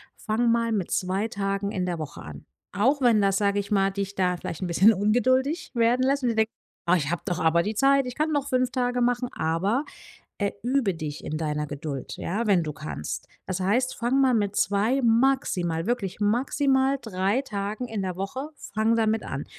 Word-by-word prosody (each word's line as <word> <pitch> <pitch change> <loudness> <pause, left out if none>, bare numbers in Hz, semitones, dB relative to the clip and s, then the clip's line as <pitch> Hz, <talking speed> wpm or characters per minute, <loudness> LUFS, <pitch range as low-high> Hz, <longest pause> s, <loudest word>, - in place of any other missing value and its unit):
fange 225 +2 -1
mal 230 0 +2
mit 200 -6 -1
2 190 +3 0
Tagen 200 -1 -2
in 185 -3 -2
der 175 - -2
Woche 155 -3 -7
an.” 75 -2 -10 0.3
Auch 265 +8 +2
wenn 235 -4 +4
das, 195 -1 +2
sage 200 -1 +1
ich 200 0 -3
mal, 195 -1 +3
dich 200 0 -4
da 180 -2 0
vielleicht 165 0 -6
'n 185 - -1
bisschen 190 +6 +5
ungeduldig 255 - +1
werden 240 +1 +2
lässt 275 +1 +1
und 250 - +1
du 230 - -1
denk 220 0 +2 0.4
„Ah, 180 - +5
ich 145 -3 -2
habe 175 -2 -2
doch 175 -1 -2
aber 170 0 +3
die 210 - -2
Zeit, 275 +3 +4
ich 250 - -5
kann 310 +1 0
doch 285 -1 0
5 255 -2 +1
Tage 245 -1 0
machen“, 245 +1 +1
aber, 195 - 0 0.5
äh, 200 -1 0
übe 245 -6 +1
dich 155 -2 -6
in 155 - -3
deiner 150 -1 -2
Geduld, 145 -2 -6
ja, 215 +7 -2
wenn 190 -5 +4
du 155 - -4
kannst. 155 - -6 0.2
Das 185 0 -3
heißt, 235 +8 +1
fange 245 +3 +1
mal 265 -2 +4
mit 205 -3 0
2, 215 +7 +2
maximal, 225 - +2
wirklich 205 -6 -2
maximal 265 +5 +2
3 200 +3 0
Tagen 210 0 -4
in 220 -3 -3
der 185 -2 -3
Woche, 255 +10 -4 0.3
fange 220 +2 +2
damit 220 0 +1
an. - - -4
210 Hz, 205 wpm, -26 LUFS, 185-245 Hz, 0.5 s, bisschen